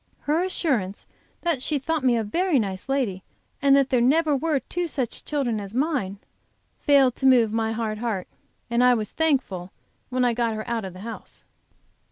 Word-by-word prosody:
Her 310 +4 +1
assurance 260 - -1 0.4
that 335 -7 0
she 300 +2 0
thought 310 +2 -2
me 245 -2 +4
a 225 - 0
very 340 - +1
nice 195 0 -2
lady, 245 -9 0 0.4
and 275 -1 +5
that 275 -1 +3
there 250 -2 +3
never 300 +4 +3
were 305 0 +1
two 350 +5 -3
such 265 -7 -3
children 265 -7 -1
as 200 +2 -8
mine, 260 - 0 0.6
failed 275 -4 +4
to 265 - +2
move 240 -4 +5
my 225 0 0
hard 220 -1 -3
heart, 215 -6 -2 0.4
and 235 +1 +2
I 250 0 +6
was 215 -3 -3
thankful 255 - 0 0.4
when 255 -1 +1
I 240 - +2
got 230 -1 0
her 215 +2 -5
out 230 -3 -2
of 185 - -7
the 185 - -11
house. 230 +2 -8
250 Hz, 190 wpm, -24 LUFS, 220-285 Hz, 0.6 s, I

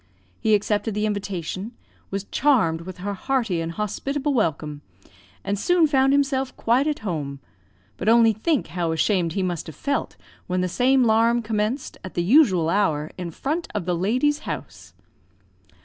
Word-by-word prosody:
He 215 -1 +3
accepted 210 +1 -1
the 210 0 0
invitation, 200 0 -4 0.4
was 195 0 -3
charmed 215 - +2
with 185 +1 -8
her 200 +3 -4
hearty 225 -5 -1
and 165 0 -3
hospitable 275 - -2
welcome, 155 - -1 0.6
and 200 0 -2
soon 355 - +3
found 270 -2 +3
himself 275 -2 +1
quite 250 +6 +2
at 300 - -1
home; 145 -7 -3 0.6
but 200 - 0
only 230 -1 +6
think 275 +8 0
how 170 -2 -1
ashamed 170 -1 +1
he 195 - -1
must 175 -3 -3
have 160 - -9
felt, 280 - -2 0.3
when 180 0 0
the 185 - 0
same 255 +7 +3
'larum 230 +1 +3
commenced, 220 +5 -2
at 185 - -8
the 175 - +1
usual 190 - +4
hour, 160 -5 +1
in 180 -2 -5
front 305 - -3
of 200 -5 -2
the 180 -1 0
lady's 255 - +1
house! - - -7
210 Hz, 165 wpm, -23 LUFS, 180-260 Hz, 0.6 s, only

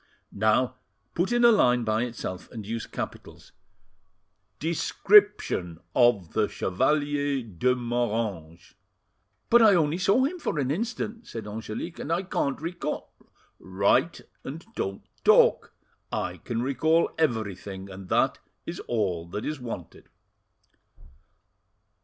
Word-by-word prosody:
"Now 110 +5 +2 0.4
put 175 +6 0
in 240 0 +4
a 235 - +8
line 125 - +4
by 110 0 +1
itself, 95 -6 -6
and 110 -4 -8
use 115 +1 -4
capitals - - -7 1.1
"'DESCRIPTION 170 - +3 0.2
OF 120 -9 +3
THE 110 -1 +2
CHEVALIER 145 +5 0
DE 115 +4 0
MORANGES." 110 -9 -3 0.8
"But 235 0 +7
I 215 -3 +7
only 160 0 +1
saw 200 +7 +3
him 340 +7 -1
for 170 - -2
an 135 -2 0
instant," 230 +4 -3
said 115 -2 -7
Angelique, 110 +10 -6
"and 155 - -4
I 170 +3 +1
can't 140 -6 -1
recall—— 165 -1 -5 0.5
"Write, 100 - +1 0.2
and 155 +5 -7
don't 95 0 -3 0.2
talk. - - +5 0.4
I - - -2
can 115 0 -3
recall 160 +5 +2
everything, 100 - -2
and 95 -1 -10
that - - +2 0.3
is - - -5
all 95 -8 -1
that 105 +5 -5
is 150 -2 -3
wanted." 115 -8 -8
125 Hz, 125 wpm, -26 LUFS, 105-165 Hz, 1.1 s, a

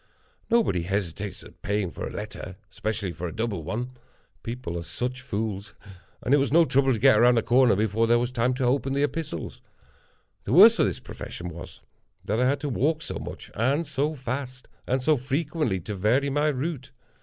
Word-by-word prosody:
Nobody 225 - +2
hesitates 95 +1 -3
at - - -16
paying 100 -3 -1
for - - -5
a - - -7
letter—especially 105 0 -5
for 85 +1 -5
a 85 - -7
double 110 -6 -2
one—people 120 0 -7
are 85 - -3
such 125 +8 -4
fools—and 105 0 -5
it - - +7
was 140 -1 +1
no 165 +2 +6
trouble 135 -2 +3
to - - -1
get 105 0 +5
round 120 +1 +5
a 115 - +2
corner 125 -2 +4
before 110 +2 +1
there 120 +1 +5
was 120 +1 -1
time 125 0 +1
to 130 - -2
open 135 +2 +1
the 140 +1 +1
epistles. 145 - -4 0.8
The - - -1
worst - - +8
of - - +4
this - - -3
profession 90 +1 -7
was, 85 0 -10 0.4
that 110 +3 0
I 125 +1 +3
had 140 +1 0
to 150 - -2
walk 155 +5 0
so - - -4
much - - -8
and 135 +9 +1
so 145 +1 -1
fast; 130 0 -5 0.2
and 130 +1 0
so 155 +2 +4
frequently 140 - -1
to 105 - -5
vary 120 +9 +1
my 145 +2 +2
route. 145 -1 -2
125 Hz, 190 wpm, -26 LUFS, 105-140 Hz, 0.8 s, worst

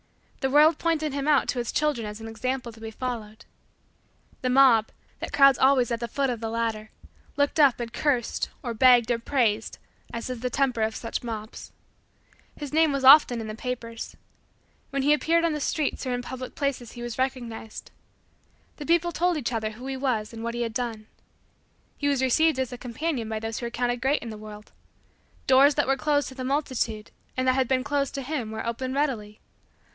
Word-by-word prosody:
The 265 - 0
world 300 +3 +5
pointed 315 -3 0
him 280 0 -2
out 295 -2 +4
to 250 - -1
its 235 - -2
children 295 -8 0
as 210 +1 -7
an 225 - -8
example 245 +2 -3
to 225 - -16
be 225 - -5
followed. 220 -2 -6 1.0
The 255 - 0
mob, 250 -4 +5 0.3
that - - -5
crowds 275 -2 +6
always 260 -3 +4
at 230 - -1
the 235 - -3
foot 270 +3 0
of 235 - -4
the 225 0 -3
ladder, 225 -1 -2 0.5
looked 285 +2 +1
up 275 -5 +5
and 235 -1 -5
cursed 255 -4 0
or 240 - -3
begged 245 0 +5
or 235 - +1
praised 230 -4 0 0.3
as 235 +2 -4
is 250 - -5
the 250 +2 -2
temper 255 -4 0
of 220 0 0
such 230 - -4
mobs. 220 -1 -7 0.9
His 290 -1 -7
name 320 -1 +4
was 275 -1 -2
often 265 -3 +8
in 225 - -5
the 215 - -5
papers. 230 -1 -6 0.7
When 275 0 -1
he 295 +2 +5
appeared 335 +2 +2
on 330 - +1
the 300 - -2
streets 290 -2 -1
or 250 - 0
in 245 - -4
public 255 0 -7
places 270 -5 -3
he 240 - -8
was 240 0 -6
recognized. 240 -4 -4 0.9
The 295 - -7
people 340 +1 +3
told 345 +1 +1
each 250 -4 -3
other 220 -1 -1
who 245 +4 -10
he 270 0 -3
was 240 -5 -1
and 225 0 -7
what 235 0 -3
he 240 - -1
had 230 -1 -4
done. 225 -2 -3 0.9
He 285 - 0
was 275 -2 +1
received 315 +4 +3
as 260 -1 -2
a - - -6
companion 245 -1 -3
by 220 - -2
those 225 0 -4
who 235 - -3
were - - -4
counted 245 0 -1
great 275 +4 +1
by 235 - -6
the 215 - -7
world. 210 0 -11 0.7
Doors 270 +2 +6
that 290 - +2
were 270 - +2
closed 290 +1 +1
to 260 - -12
the 260 - -5
multitude, 255 -6 -2 0.3
and 255 0 0
that 255 - +5
had 260 -1 +1
been 255 0 +1
closed 280 0 -1
to 275 - -3
him, 260 -5 -3
were 220 0 -5
opened 255 +3 -3
readily. 225 -8 -2
255 Hz, 210 wpm, -26 LUFS, 230-280 Hz, 1.0 s, often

